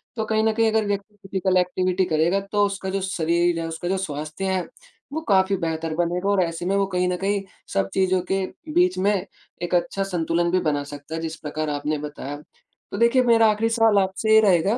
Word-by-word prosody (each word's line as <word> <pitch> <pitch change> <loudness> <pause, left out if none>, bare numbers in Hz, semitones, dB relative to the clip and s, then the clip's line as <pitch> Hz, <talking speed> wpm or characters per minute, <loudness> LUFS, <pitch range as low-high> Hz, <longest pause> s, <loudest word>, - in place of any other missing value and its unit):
तो 220 -2 -2
कहीं 220 0 +1
न 220 - +3
कहीं 225 0 +2
अगर 220 -1 +1
व्यक्ति 205 +1 -3
फिजिकल 190 -1 -1
एक्टिविटी 185 +1 +1
करेगा 170 +3 +2
तो 205 -1 +3
उसका 195 -1 -3
जो 195 +1 -1
शरीर 170 -2 +1
है, 165 - -3
उसका 165 +2 -5
जो 190 +1 0
स्वास्थ्य 155 +1 -4
है 185 -2 -1 0.5
वो 315 - -2
काफ़ी 190 0 +4
बेहतर 165 -2 -2
बनेगा 175 +3 0
और 200 -2 +3
ऐसे 165 0 -4
में 195 +2 +1
वो 200 0 +2
कहीं 180 -1 0
न 180 - 0
कहीं 200 +2 0 0.3
सब 95 0 +1
चीज़ों 185 -1 +2
के 195 0 +1 0.3
बीच 360 - +3
में 200 +3 +2 0.5
एक 175 +1 -3
अच्छा 195 +2 0
संतुलन 170 -2 0
भी 185 - +3
बना 145 -3 0
सकता 145 +2 -8
है, 165 - -4
जिस 160 0 -4
प्रकार 155 0 -4
आपने 150 +1 -1
बताया। 145 -1 -6 0.6
तो 200 - -4
देखिए 235 +3 +4
मेरा 230 -2 +5
आखिरी 220 +2 0
सवाल 225 -2 +3
आपसे 195 +3 +1
ये 220 - +8
रहेगा 195 +2 +3
185 Hz, 215 wpm, -23 LUFS, 165-200 Hz, 0.6 s, ये